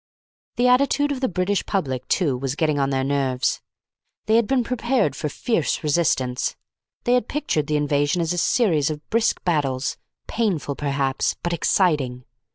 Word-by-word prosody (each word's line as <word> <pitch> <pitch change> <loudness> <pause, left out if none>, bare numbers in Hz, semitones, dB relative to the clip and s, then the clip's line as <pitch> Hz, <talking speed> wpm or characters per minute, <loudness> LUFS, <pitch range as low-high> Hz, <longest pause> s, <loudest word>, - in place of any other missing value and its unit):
The 245 +1 +2
attitude 280 +3 +3
of 275 - -2
the 260 - +1
British 185 +2 0
public, 130 -10 -2
too, 155 -9 +1
was 135 +2 -3
getting 155 -2 +1
on 135 0 +1
their 135 -1 0
nerves. 135 -2 0 0.6
They 220 - +3
had 230 -2 +3
been 265 -2 +2
prepared 235 - 0
for 150 - -3
fierce 195 - -1
resistance. 140 -5 0 0.5
They 245 - +2
had 250 -3 +2
pictured 220 - -1
the 150 - +1
invasion 145 +2 +1
as 165 0 0
a 175 - -1
series 170 - +2
of 150 -1 -6
brisk 230 0 +1
battles 140 -7 0 0.3
painful 180 - -1
perhaps, 140 -2 -1
but 175 - -1
exciting. 150 -8 +1
155 Hz, 165 wpm, -23 LUFS, 140-220 Hz, 0.6 s, attitude